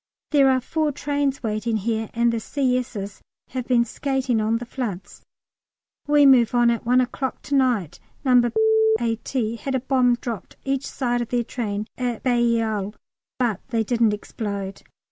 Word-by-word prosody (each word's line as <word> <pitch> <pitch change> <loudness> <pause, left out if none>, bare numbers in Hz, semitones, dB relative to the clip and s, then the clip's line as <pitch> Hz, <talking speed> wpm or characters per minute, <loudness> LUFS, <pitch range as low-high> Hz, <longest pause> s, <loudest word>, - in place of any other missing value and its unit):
There 280 -3 +5
are 260 -1 +3
four 310 +3 -1
trains 285 -1 -2
waiting 220 +1 -1
here, 220 +1 -2
and 235 0 +2
the 230 - -1
C.S.'s 250 -6 -2 0.3
have 255 -1 -4
been 240 -2 +3
skating 260 -2 -1
on 220 +2 +1
the 240 - -6
floods. 230 -7 -6 0.9
We 295 -1 +5
move 250 -3 +5
on 240 -1 +5
at 235 0 -3
1 250 +1 +5
o'clock 260 +1 -3
to 285 - -5
night. 235 - +1 0.3
No. 245 -2 +5 0.5
A.T. 230 0 -2
had 265 +4 -3
a - - +2
bomb 255 -1 +2
dropped 235 -4 -7
each 275 0 -1
side 245 -2 -1
of 235 - -4
their 245 -1 0
train 210 -3 -3
at 245 -3 -2
Bailleul, 230 -4 +1 0.4
but 235 -7 0
they 225 -2 0
didn't 230 -2 +2
explode. 200 -2 -5
240 Hz, 160 wpm, -23 LUFS, 220-260 Hz, 0.9 s, There